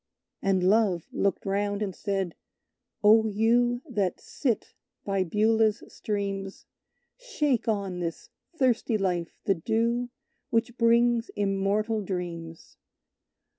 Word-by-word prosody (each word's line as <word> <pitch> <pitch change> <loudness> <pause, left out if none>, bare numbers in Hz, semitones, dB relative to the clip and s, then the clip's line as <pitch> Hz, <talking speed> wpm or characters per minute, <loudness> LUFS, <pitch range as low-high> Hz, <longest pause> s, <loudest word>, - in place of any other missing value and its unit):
And 190 -2 +1
Love 190 -3 +3
looked 200 -2 -1
round, 205 +1 0
and 195 -2 -3
said: 195 -4 -2 0.7
"Oh, 220 +1 +6
you 240 +4 +2
That 205 -8 -1
sit 245 -7 -2 0.3
by 195 -1 +1
Beulah's 215 +4 +2
streams, 200 -3 -4 0.5
Shake 300 - -1
on 200 -4 -1
this 170 -1 -5 0.3
thirsty 245 -4 +2
life 180 -4 -2
the 195 - +3
dew 230 +7 0 0.4
Which 230 +1 0
brings 235 0 +3
immortal 205 +2 0
dreams! 170 -4 -6
210 Hz, 105 wpm, -27 LUFS, 195-230 Hz, 0.7 s, Oh